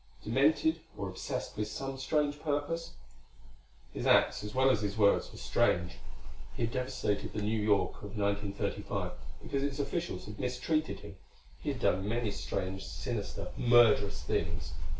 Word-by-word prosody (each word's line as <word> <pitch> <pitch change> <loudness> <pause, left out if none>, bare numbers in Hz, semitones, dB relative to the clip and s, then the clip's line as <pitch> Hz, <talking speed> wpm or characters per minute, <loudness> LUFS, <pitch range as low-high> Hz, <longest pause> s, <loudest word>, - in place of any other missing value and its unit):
Demented, 150 +7 +3 0.2
or 100 - -3
obsessed 95 +2 -4
with 105 0 -1
some 135 +4 -4
strange 145 +1 +1
purpose? 150 +2 -2 1.0
His - - -2
acts - - +5
as 105 +2 -6
well 130 +1 +5
as 110 - +1
his 100 0 -2
words, 100 -2 +4
were - - -11
strange. 85 0 +1 0.6
He - - -2
had 115 - 0
devastated 125 -5 -1
the 105 - -2
New 110 +1 +1
York 105 -1 +2
of 105 +1 -7
1935 100 -2 -1 0.3
because 140 - -1
its 140 -1 -1
officials 140 - -2
had 105 0 -9
mistreated 125 +6 -1
him. - - -10 0.4
He - - -2
had - - -5
done 95 +2 +2
many 115 -1 0
strange, 95 -1 -3
sinister, 75 0 -4
murderous 115 - +5
things. 85 -2 -2
110 Hz, 150 wpm, -32 LUFS, 100-135 Hz, 1.0 s, acts